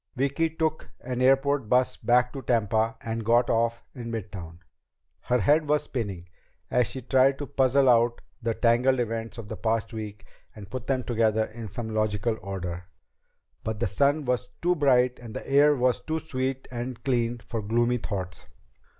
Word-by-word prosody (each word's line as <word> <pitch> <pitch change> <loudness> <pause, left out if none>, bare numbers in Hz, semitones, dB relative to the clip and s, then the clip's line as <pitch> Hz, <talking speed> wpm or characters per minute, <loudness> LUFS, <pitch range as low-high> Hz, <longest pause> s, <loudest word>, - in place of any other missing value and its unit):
Vicki 140 +5 +1
took 160 -1 -2
an 125 0 -3
airport 135 -1 +3
bus 125 0 +3
back 125 +1 +2
to 135 - -5
Tampa 110 -2 +1
and 115 0 -3
got 120 +2 +3
off 115 0 +1
in 120 -3 -7
midtown. 95 -6 -6 0.6
Her 125 - +1
head 150 - +3
was 150 0 +3
spinning 100 -8 -4 0.4
as 125 -3 +3
she 130 - -5
tried 130 +2 +3
to 145 - -4
puzzle 135 0 +3
out 120 -1 +4 0.2
the 115 -1 -1
tangled 125 +2 +3
events 115 0 -3
of 115 -3 -7
the - - -6
past 115 0 -1
week 105 -2 -7 0.3
and 105 -1 -11
put 130 -1 -5
them 130 -2 0
together 110 -2 +1
in 110 0 -8
some 110 +3 -5
logical 110 +1 0
order. 90 -2 -5 0.8
But 110 -1 -3
the 120 - 0
sun 140 +9 +1
was 125 -5 -1
too 175 +1 +4
bright 125 -5 +3
and 115 -3 -10
the - - -6
air 145 +2 +5
was 125 -2 +1
too 160 0 -2
sweet 130 -4 -3
and 120 0 -5
clean 120 -2 0
for 115 -1 -5
gloomy 120 +3 +1
thoughts. 95 -6 -5
120 Hz, 175 wpm, -26 LUFS, 110-130 Hz, 0.8 s, air